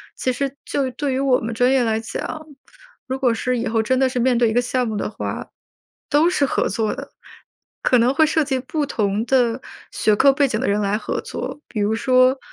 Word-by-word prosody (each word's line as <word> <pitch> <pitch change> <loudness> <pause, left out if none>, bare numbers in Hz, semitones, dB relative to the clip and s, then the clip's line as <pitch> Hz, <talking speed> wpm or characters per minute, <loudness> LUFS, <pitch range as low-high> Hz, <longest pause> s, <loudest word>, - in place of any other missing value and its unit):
其 255 - -1
实 275 +1 -2
就 270 -2 -1
对 270 +2 -2
于 260 - -1
我 270 -2 +3
们 230 +1 -4
专 245 +3 +2
业 265 -2 +3
来 220 -1 0
讲， 230 +7 -5 0.6
如 260 0 -4
果 255 -3 +3
是 250 +2 -1
以 240 - -2
后 225 0 +1
真 260 +4 +1
的 265 -1 +3
是 255 - -5
面 250 +1 +2
对 235 -2 +3
一 - - -2
个 240 - +3
项 245 0 -1
目 215 -1 -3
的 - - -2
话， - - -5 0.6
都 300 +3 +4
是 285 -5 +1
合 - - 0
作 220 -2 -1
的， - - -9 0.7
可 250 - +4
能 240 +2 +3
会 315 +4 +4
涉 315 0 +1
及 265 -2 -1
不 290 +3 -3
同 205 -3 -1
的 245 -2 +2 0.3
学 215 - +2
科 275 +5 +5
背 280 +1 +2
景 220 -4 -2
的 265 - -1
人 205 +1 +1
来 205 0 0
合 - - -3
作。 295 - -6
比 215 - -5
如 205 +1 +1
说 255 +2 +3
250 Hz, 250 characters per minute, -21 LUFS, 225-270 Hz, 0.7 s, 科